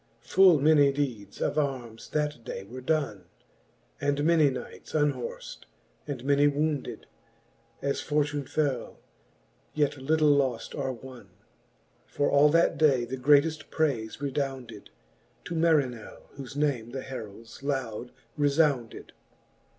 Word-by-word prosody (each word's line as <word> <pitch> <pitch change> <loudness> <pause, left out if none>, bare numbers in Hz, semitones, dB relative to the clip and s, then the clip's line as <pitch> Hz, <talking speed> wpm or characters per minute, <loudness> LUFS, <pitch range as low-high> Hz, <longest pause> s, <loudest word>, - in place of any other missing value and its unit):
Full 185 -5 +5
many 145 -1 +5
deedes 125 -8 -4
of 155 - +1
armes 125 -6 -4
that 150 -5 -2
day" 95 - -6
were 125 +6 -9
donne, 130 - -1 0.8
And 145 0 0
many 160 -2 +4
knights 130 - -8
unhorft, 145 -5 -2 0.4
and 135 -4 -5
many 145 +1 +4
wounded, 145 -1 -2 0.8
As 140 0 -1
fortune 145 -2 -1
fell; 145 -5 -2 0.8
yet 145 -1 +1
litle 155 +2 +3
loft 135 -5 +1
or 135 -2 -2
wonne: 125 -4 -11 0.9
But 145 - +2
all 145 +1 +5
that 165 +3 +3
day 135 -6 +4
the 125 +2 -4
greateft 150 +4 +3
prayfe 130 -10 -1
redounded 135 -6 -4 0.6
To - - -5
Marinell, 150 -9 0
whole 135 -2 -8
name 140 -6 0
the 130 +2 -6
heralds 115 -3 -9
loud 125 -4 -3 0.3
refbunded. 145 -5 +1
140 Hz, 120 wpm, -28 LUFS, 125-150 Hz, 0.9 s, Full